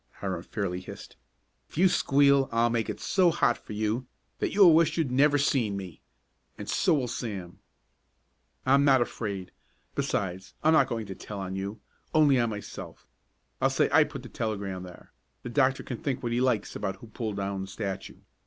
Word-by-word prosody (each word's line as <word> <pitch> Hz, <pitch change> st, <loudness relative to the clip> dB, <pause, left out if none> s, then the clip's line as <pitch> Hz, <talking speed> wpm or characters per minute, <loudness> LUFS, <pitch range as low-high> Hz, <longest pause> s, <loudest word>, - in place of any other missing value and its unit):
Hiram 95 Hz, -4 st, -4 dB
fairly 90 Hz, -1 st, -3 dB
hissed. 90 Hz, -, -10 dB, 0.5 s
"If -, -, -13 dB
you 185 Hz, +3 st, +6 dB
squeal 140 Hz, -4 st, +4 dB
I'll 115 Hz, +1 st, +2 dB
make 115 Hz, -1 st, 0 dB
it -, -, -4 dB
so 185 Hz, -3 st, +3 dB
hot 120 Hz, -7 st, +2 dB
for -, -, -10 dB
you 110 Hz, +4 st, -1 dB, 0.3 s
that -, -, -1 dB
you'll 190 Hz, -5 st, +7 dB
wish 160 Hz, 0 st, +3 dB
you'd 155 Hz, -6 st, 0 dB
never 145 Hz, +3 st, +4 dB
seen 125 Hz, -8 st, +1 dB
me 95 Hz, -4 st, -8 dB, 0.6 s
and -, -, -7 dB
so -, -, +2 dB
will 130 Hz, -4 st, 0 dB
Sam." 100 Hz, -7 st, -5 dB, 1.1 s
"I'm 140 Hz, +2 st, +5 dB
not 135 Hz, -3 st, +5 dB
afraid! 100 Hz, -6 st, -5 dB, 0.4 s
Besides 95 Hz, -1 st, -2 dB
I'm 160 Hz, +1 st, +5 dB
not 155 Hz, -, +5 dB
going 115 Hz, -2 st, -3 dB
to 95 Hz, -, -6 dB
tell 100 Hz, +2 st, -8 dB
on 95 Hz, 0 st, -4 dB
you 100 Hz, +3 st, -5 dB, 0.3 s
only 145 Hz, -4 st, +5 dB
on 120 Hz, -1 st, +2 dB
myself. 105 Hz, -1 st, -8 dB, 0.6 s
I'll 135 Hz, -, +4 dB
say 135 Hz, -, +2 dB
I 155 Hz, +2 st, +7 dB
put 145 Hz, -4 st, -7 dB
the 120 Hz, -, -9 dB
telegram 100 Hz, -5 st, -3 dB
there. 90 Hz, -1 st, -12 dB, 0.3 s
The -, -, -5 dB
doctor 135 Hz, +1 st, +2 dB
can 125 Hz, -, -5 dB
think 135 Hz, -3 st, -3 dB
what 120 Hz, -, -1 dB
he 120 Hz, +1 st, +1 dB
likes 125 Hz, -5 st, 0 dB
about 95 Hz, -, -3 dB
who 95 Hz, -, -13 dB
pulled 110 Hz, -2 st, -5 dB
down 100 Hz, -1 st, -2 dB
the 95 Hz, -, -5 dB
statue. 95 Hz, 0 st, -5 dB
115 Hz, 190 wpm, -28 LUFS, 100-140 Hz, 1.1 s, you'll